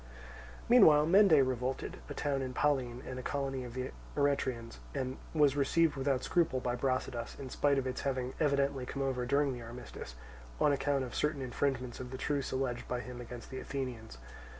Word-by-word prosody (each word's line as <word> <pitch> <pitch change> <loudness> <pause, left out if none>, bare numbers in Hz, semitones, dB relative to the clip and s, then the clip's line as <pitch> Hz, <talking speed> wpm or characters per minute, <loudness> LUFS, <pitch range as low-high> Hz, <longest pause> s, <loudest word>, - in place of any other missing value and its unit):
Meanwhile 160 -12 +7
Mende 165 -6 +6
revolted, 130 +1 -2
a - - -5
town 140 -2 0
in 130 -1 -4
Pallene 130 -4 +1
and 130 0 -5
a - - -4
colony 135 -1 -2
of 120 -1 -8
the 130 0 -3 0.3
Eretrians, 130 -5 0 0.2
and 130 -1 -2
was 145 -3 +4
received 150 +3 +3
without 135 -1 0
scruple 165 -7 +2
by 125 -1 -1
Brasidas, 130 -2 -2
in 130 -2 -7
spite 145 -1 +2
of 135 - 0
its 130 - -3
having 130 -2 -2
evidently 140 -3 +1
come 135 - -3
over 125 -2 -1
during 140 +1 +2
the 120 - -7
armistice, 115 - -8 0.4
on 150 - +4
account 140 -1 +1
of 125 - -6
certain 150 -2 0
infringements 130 -1 -2
of 125 - -6
the 130 - -6
truce 140 0 -1
alleged 130 -2 -2
by 125 0 -2
him 125 0 -8
against 120 +1 -9
the 130 - -4
Athenians. 125 - -5
130 Hz, 185 wpm, -33 LUFS, 125-140 Hz, 0.4 s, Meanwhile